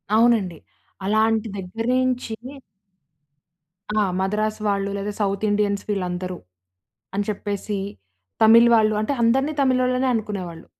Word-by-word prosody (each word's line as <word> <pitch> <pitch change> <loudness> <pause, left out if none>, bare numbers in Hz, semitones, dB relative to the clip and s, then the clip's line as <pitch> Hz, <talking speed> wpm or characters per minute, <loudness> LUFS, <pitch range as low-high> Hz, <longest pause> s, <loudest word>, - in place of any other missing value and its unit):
అవునండి. 220 -7 +3 0.5
అలాంటి 220 +1 +2
దగ్గర 195 +5 -5 0.2
నుంచి 250 -3 -1 1.7
ఆ! - - +4 0.2
మద్రాస్ 215 +3 -1
వాళ్ళు, 200 0 0
లేదా 200 +1 -3
సౌత్ 200 +1 -1
ఇండియన్స్ 205 -1 0
వీళ్ళందరూ, 180 -2 -2 0.8
అని 205 - 0
చెప్పేసి 205 0 -3 0.7
తమిళ్ 230 +2 +7
వాళ్ళు 215 -1 +3
అంటే, 250 +6 -1
అందరిని 270 +6 +2
తమిళ్ళోళ్లనే 255 -1 +2
అనుకునేవాళ్ళు. 185 -6 -5
210 Hz, 105 wpm, -23 LUFS, 195-230 Hz, 1.7 s, తమిళ్